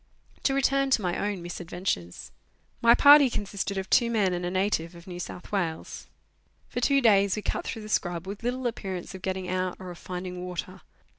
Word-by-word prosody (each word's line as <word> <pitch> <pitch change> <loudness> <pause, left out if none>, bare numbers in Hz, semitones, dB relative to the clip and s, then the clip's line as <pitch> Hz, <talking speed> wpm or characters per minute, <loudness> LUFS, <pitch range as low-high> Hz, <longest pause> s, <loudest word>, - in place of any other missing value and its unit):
To 270 - +3
return 275 0 +2
to 260 - +3
my 175 -1 0
own 200 -3 -2
misadventures. 175 - -4 0.5
My 235 0 +7
party 285 -1 +8
consisted. 200 -2 -3
of 190 0 -3
two 235 -2 +4
men 205 -5 +2
and 175 0 -3
a 175 - -1
native 185 -3 0
of 170 0 -13
New 180 -1 -7
South 180 0 -7
Wales. 170 -6 -3 0.6
For 245 - -3
two 275 +2 +3
days 200 -4 +4
we 210 - -5
cut - - -2
through 220 - -5
the - - -8
scrub, 175 -4 -1
with 200 +2 -6
little 250 +2 -2
appearance 195 -7 -4
of 190 - -9
getting 190 -1 -3
out 185 0 -1
or 185 -1 -7
of 175 - -11
finding 180 0 -6
water. 180 +1 -6
190 Hz, 200 wpm, -27 LUFS, 180-225 Hz, 0.6 s, party